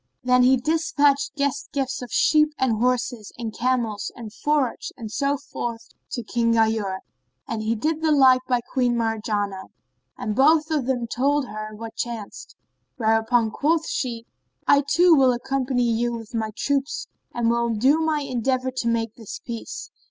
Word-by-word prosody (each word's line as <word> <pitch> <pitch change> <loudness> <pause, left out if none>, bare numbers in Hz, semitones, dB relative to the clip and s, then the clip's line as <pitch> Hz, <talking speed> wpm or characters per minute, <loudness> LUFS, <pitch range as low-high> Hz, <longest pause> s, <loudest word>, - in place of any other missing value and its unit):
Then 250 0 +4
he 260 +1 +5
despatched 295 - +1
guest 280 -1 -1
gifts 270 -2 -2
of 250 - -8
sheep 305 -1 +3
and 235 -5 +1
horses 245 -3 0
and 225 -3 -5
camels 235 -4 -1
and 220 -3 -9
forage 290 -4 -1
and 225 -4 -7
so 280 +4 0
forth 235 -4 -6 0.2
to 240 - -3
King 230 +1 +1
Ghayur, 220 -4 +1 0.5
and 220 0 -2
did 315 +4 -1
the 320 -1 +2
like 260 -3 +6
by 245 -2 +1
Queen 245 0 0
Marjanah; 210 -4 -2 0.5
and 210 - -3
both 310 +4 +4
of 290 -5 0
them 250 -3 0
told 275 +4 0
her 215 0 -6
what 225 +1 -8
chanced; 230 -4 -6 0.4
whereupon 225 0 +2
quoth 320 +5 +1
she, 235 -3 -3 0.4
"I 285 - +6
too 350 0 +5
will 265 -4 +5
accompany 260 0 -1
you 235 0 +1
with 225 -1 -8
my 220 -1 -1
troops 280 0 -1 0.3
and 235 -1 +1
will 235 0 +1
do 260 +8 +3
my 315 -2 0
endeavour 255 0 -1
to 255 -2 -3
make 230 -1 0
this 225 -4 -8
peace." 230 -2 -7
245 Hz, 160 wpm, -23 LUFS, 225-275 Hz, 0.5 s, like